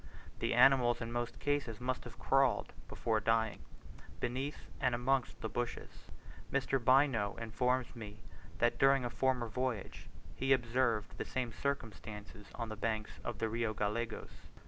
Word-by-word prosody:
The - - +1
animals 125 -3 +6
in 115 0 -4
most 120 0 -2
cases 145 -6 -1
must 125 +1 -2
have 120 -1 -10
crawled, 135 +5 +2
before 110 -2 0
dying, 110 -1 +1 0.6
beneath 135 - -3
and 125 -2 +2
amongst 125 +1 0
the - - -1
bushes. 120 +3 -4 0.5
Mr. 135 -1 +1
Bynoe 130 -6 +4
informs 125 +2 0
me 105 -2 -8 0.4
that 120 +3 +2
during 135 -1 +5
a 120 - -2
former 130 -2 +1
voyage 125 -2 -3 0.3
he 135 +1 +3
observed 120 -3 +1
the - - -2
same 125 -3 -2
circumstance 110 -6 -4 0.2
on 115 -1 -4
the 110 - -4
banks 110 0 -2
of 120 -3 -4
the 115 0 0
Rio 115 -1 -1
Gallegos. 110 +2 -2
120 Hz, 145 wpm, -35 LUFS, 110-130 Hz, 0.6 s, animals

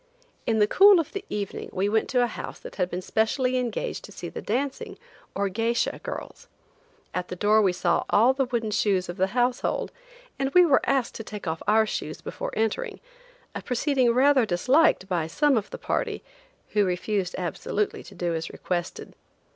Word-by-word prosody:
In 225 - +2
the 210 - +5
cool 390 - +7
of 320 - -2
the 395 - -4
evening 205 -2 -4
we 190 +2 0
went 220 +1 +1
to 250 -1 +3
a - - +4
house 235 - -6
that - - -11
had 180 -2 0
been 180 +1 -4
specially 250 +5 +1
engaged 245 -3 -3
to - - -13
see - - -7
the - - -7
dancing, 265 +5 -3 0.4
or 200 0 0
geisha, 230 +4 -1
girls. - - -7 0.7
At 180 0 -3
the - - -6
door 210 +4 +4
we 195 -3 +3
saw 180 -1 0
all 235 +6 +5
the 265 0 0
wooden 235 -3 -2
shoes 200 -4 +1
of 175 - -5
the 190 0 +2
household, 245 +1 0 0.5
and 270 0 0
we 360 0 +8
were 280 -5 +4
asked 265 -3 +1
to 225 - -6
take 210 -2 -8
off 160 -1 -3
our 220 +1 +5
shoes - - -4
before - - -5
entering, 220 -1 -1 0.5
a - - -5
proceeding 255 -1 +1
rather 265 +2 +4
disliked 225 - +3
by 175 -4 -1
some 290 - +2
of 215 -3 -1
the - - -7
party, - - -2 0.5
who 210 - +2
refused 185 +1 -1
absolutely 185 +3 -2
to 195 - -13
do 175 -1 -1
as 160 0 -3
requested. 175 -1 -4
220 Hz, 190 wpm, -26 LUFS, 185-255 Hz, 0.7 s, we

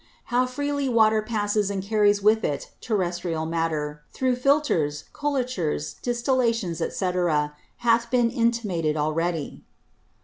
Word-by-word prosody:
How 250 +1 +3
freely 285 +1 -2
Water 220 -2 +4
passes 210 -2 0
and 195 -2 -3
carries 205 -1 +2
with 220 +1 +4
it 140 -1 -2
Terrestrial 175 -6 -1
Matter, 155 -2 -2
through 255 -1 0
Filtres, 250 - +1
Colatures, 255 - -2
Distillations, 235 -7 0
&c. 180 +2 -1 0.7
hath 235 0 +2
been 240 -2 +2
intimated 210 - 0
already. 155 +1 -2
215 Hz, 110 wpm, -25 LUFS, 165-245 Hz, 0.7 s, Water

